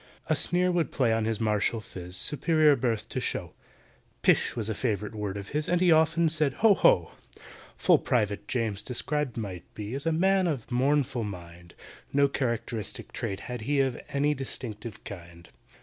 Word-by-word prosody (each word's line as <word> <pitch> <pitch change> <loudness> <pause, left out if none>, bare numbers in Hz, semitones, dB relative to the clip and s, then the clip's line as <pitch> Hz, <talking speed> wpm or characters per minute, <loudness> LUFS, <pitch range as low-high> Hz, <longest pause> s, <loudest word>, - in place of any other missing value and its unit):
A 155 - +1
sneer 180 +4 +2
would 175 -3 +1
play 120 -4 +1
on 110 -1 0
his 110 -1 -1
martial 110 +1 +1
phiz, 90 -4 -8
Superior 155 0 +3
birth 115 -4 -1
to - - -3
show; - - -3 0.7
"Pish!" - - +3
was 115 -3 -2
a 110 - -1
favourite 105 -1 -2
word 105 -2 -4
of 100 0 -7
his, 150 +1 -1
And 175 - +2
he 180 -1 +4
often 160 +1 +4
said 155 -3 +1
"Ho! 215 - +8
ho!" 85 - +4 0.7
FULL - - +4
PRIVATE 105 -4 0
JAMES 110 -5 -1
described 130 +3 -2
might 95 -6 -6
be, 105 +2 -5
As 140 +4 -3
a - - +3
man 190 +3 +3
of 140 -9 -2
a - - -7
mournful 130 -1 +1
mind; 85 -3 -9 0.4
No 140 0 +4
characteristic 115 -5 -3
trait 95 0 -4
had 125 -2 -6
he 140 +5 0
Of 130 -3 -1
any 145 +1 +1
distinctive 115 -5 -4
kind. 85 -3 -10
120 Hz, 180 wpm, -28 LUFS, 105-150 Hz, 0.7 s, Ho